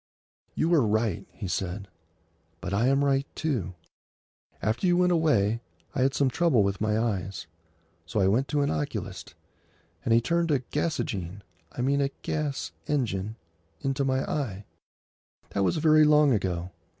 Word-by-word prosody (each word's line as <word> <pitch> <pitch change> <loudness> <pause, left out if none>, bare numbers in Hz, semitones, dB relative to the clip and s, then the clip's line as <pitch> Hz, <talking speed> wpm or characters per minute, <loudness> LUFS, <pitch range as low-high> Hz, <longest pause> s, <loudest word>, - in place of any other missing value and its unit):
"You 165 +2 +2
are 160 - +6
right," 110 -4 0
he 100 - -6
said. 95 +2 -3 0.7
"But 90 +3 -4
I 110 +5 +2
am 135 +1 +3
right, 140 0 +2
too. 115 - -2 0.8
After 110 +11 0
you 175 0 +4
went 180 0 +4
away 115 - +2 0.3
I 140 - -1
had 135 +2 +2
some 140 - +3
trouble 130 -4 +3
with 100 0 -1
my 110 0 +1
eyes. 100 -5 -2 0.6
So 105 - -1
I 95 - +4
went 120 +8 +2
to 145 -1 0
an 140 - +1
oculist, 75 -2 -4 0.7
and - - -1
he 115 - +6
turned 170 +7 0
a 145 - +4
gasogene—I 115 - -4
mean 140 +2 +2
a 135 - +1
gas 145 - -2 0.2
engine—into 100 - -3
my 130 0 +1
eye. 105 -9 -3 0.9
That 100 - 0
was 160 - +1
very 155 0 +5
long 150 -2 +5
ago. 90 -4 -1
120 Hz, 150 wpm, -27 LUFS, 100-145 Hz, 0.9 s, are